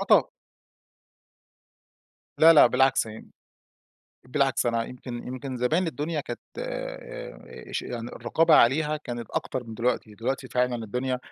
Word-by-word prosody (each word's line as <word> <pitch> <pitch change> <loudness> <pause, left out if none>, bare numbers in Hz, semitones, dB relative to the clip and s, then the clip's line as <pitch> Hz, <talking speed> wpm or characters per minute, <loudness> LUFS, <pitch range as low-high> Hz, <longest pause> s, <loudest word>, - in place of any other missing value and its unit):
آه - - -1
طبعًا. - - +6 2.2
لا 165 +1 +9
لأ، 150 - +8
بالعكس 130 0 +3
يعني، 110 0 -10 1.0
بالعكس 135 -1 +1
أنا 115 -1 +1
يمكن 125 -1 -8
يمكن 130 +1 -5
زمان 155 +9 +1
الدنيا 155 0 -2
كانت - - -7 1.3
اش - - -3
يعني 120 -1 -5
الرقابة 155 +9 +2
عليها 150 +4 +4
كانت 120 -6 -7
أكتر 130 -1 -3
من 115 -1 -8
دلوقتي، 115 -2 -1
دلوقتي 125 +5 -3
فعلًا 125 0 +1
الدنيا 125 +4 -2
125 Hz, 125 wpm, -26 LUFS, 120-145 Hz, 2.2 s, لا